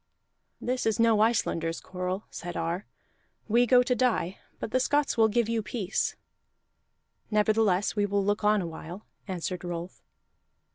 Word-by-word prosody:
"This 250 -1 -1
is 220 -1 +1
no 230 -2 +4
Icelanders 165 -7 +1
quarrel," 185 +2 -4
said 175 0 -6
Ar. 170 +4 -2 0.6
"We 240 +3 +4
go 250 +1 +6
to 250 - +1
die, 240 -8 0 0.2
but - - -5
the 255 - +2
Scots 290 +2 +1
will 225 -2 +5
give 225 +1 +1
you 230 -1 0
peace." 200 -1 -2 1.1
"Nevertheless 210 -2 +2
we 205 -1 +1
will 200 0 0
look 205 +1 0
on 210 -2 +3
a - - -4
while," 170 +4 -8 0.2
answered 180 -1 -4
Rolf. 175 0 -6
210 Hz, 150 wpm, -28 LUFS, 180-230 Hz, 1.1 s, go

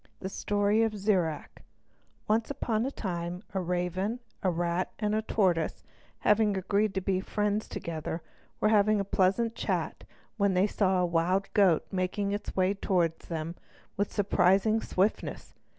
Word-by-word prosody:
The 190 - -4
Story 205 +2 +1
of 220 -2 0
Zirac 185 -7 -1 0.7
Once 220 +1 +1
upon 235 -4 -1
a - - 0
time 175 -4 -4
a 190 - 0
raven, 180 +5 -1 0.2
a 190 - +2
rat, 175 +1 -1
and 210 -1 0
a 215 - +1
tortoise, 185 -7 0 0.4
having 210 -1 +3
agreed 200 +2 0
to 190 - 0
be 185 0 0
friends 210 +2 -1
together, 160 0 -5 0.4
were 215 - +3
having 215 0 +4
a 200 - -1
pleasant 200 +5 +2
chat - - -2 0.3
when 200 -3 +2
they 185 +2 +4
saw 190 -3 +1
a - - +3
wild 175 +3 0
goat 190 -6 +4
making 190 +2 -1
its 205 +1 -4
way 185 +1 +2
toward 175 -5 0
them 165 0 -5 0.4
with 205 0 -1
surprising 200 +2 +3
swiftness. 195 +4 -1
195 Hz, 150 wpm, -29 LUFS, 180-210 Hz, 0.7 s, having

